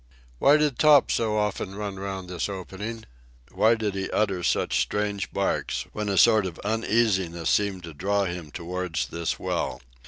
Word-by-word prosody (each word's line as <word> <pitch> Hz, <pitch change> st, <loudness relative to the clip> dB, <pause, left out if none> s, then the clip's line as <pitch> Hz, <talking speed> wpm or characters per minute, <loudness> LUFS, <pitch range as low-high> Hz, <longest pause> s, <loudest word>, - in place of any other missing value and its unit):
Why 145 Hz, +2 st, +6 dB
did 150 Hz, -4 st, 0 dB
Top 150 Hz, -3 st, +6 dB
so 110 Hz, -2 st, +1 dB
often 105 Hz, -2 st, -2 dB
run 100 Hz, -2 st, -5 dB
round 95 Hz, -1 st, -5 dB
this 90 Hz, +2 st, -3 dB
opening? 100 Hz, +4 st, -6 dB, 0.5 s
Why 115 Hz, +2 st, +4 dB
did 110 Hz, -3 st, -2 dB
he 95 Hz, 0 st, -3 dB
utter 100 Hz, -4 st, 0 dB
such 85 Hz, -, +1 dB
strange 105 Hz, -2 st, -2 dB
barks -, -, -1 dB
when 105 Hz, -1 st, -3 dB
a 100 Hz, -, 0 dB
sort 110 Hz, -3 st, +5 dB
of 85 Hz, -, -8 dB
uneasiness 105 Hz, -6 st, +1 dB
seemed 100 Hz, -3 st, +1 dB
to 85 Hz, -1 st, -8 dB
draw 100 Hz, +6 st, 0 dB
him 85 Hz, -3 st, -5 dB
towards 85 Hz, +1 st, -3 dB
this 85 Hz, 0 st, -2 dB
well? -, -, -2 dB
100 Hz, 165 wpm, -26 LUFS, 90-110 Hz, 0.5 s, Why